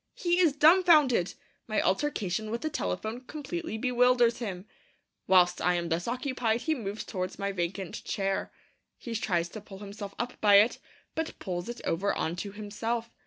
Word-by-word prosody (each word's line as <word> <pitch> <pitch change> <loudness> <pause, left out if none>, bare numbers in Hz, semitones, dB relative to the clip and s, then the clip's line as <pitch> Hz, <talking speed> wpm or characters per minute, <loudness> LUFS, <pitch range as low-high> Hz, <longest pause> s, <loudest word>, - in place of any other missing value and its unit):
He 350 0 +1
is 325 -6 +4
dumbfounded. 305 - +5 0.3
My 215 - 0
altercation 215 -3 0
with 230 +2 -3
the 310 - -2
telephone 215 - -3
completely 310 -1 -5
bewilders 245 -1 +3
him. 195 -5 -5 0.6
Whilst 180 -1 +4
I 180 0 +2
am 170 -1 -2
thus 170 +1 -1
occupied, 245 -2 -1
he 320 - +1
moves 215 -6 -4
towards 185 -2 -4
my 200 0 -2
vacant 185 0 -4
chair. 195 -1 -2 0.5
He 235 - -7
tries 175 -6 0
to 215 - -8
pull 195 -1 -11
himself 200 0 -8
up 245 +1 -4
by 205 -1 +6
it, 210 +4 +5 0.3
but 320 0 -3
pulls 180 +2 -4
it 240 - -6
over 195 +5 +1
on 160 - -1
to 200 +3 -5
himself. 225 +3 -4
215 Hz, 165 wpm, -29 LUFS, 190-250 Hz, 0.6 s, by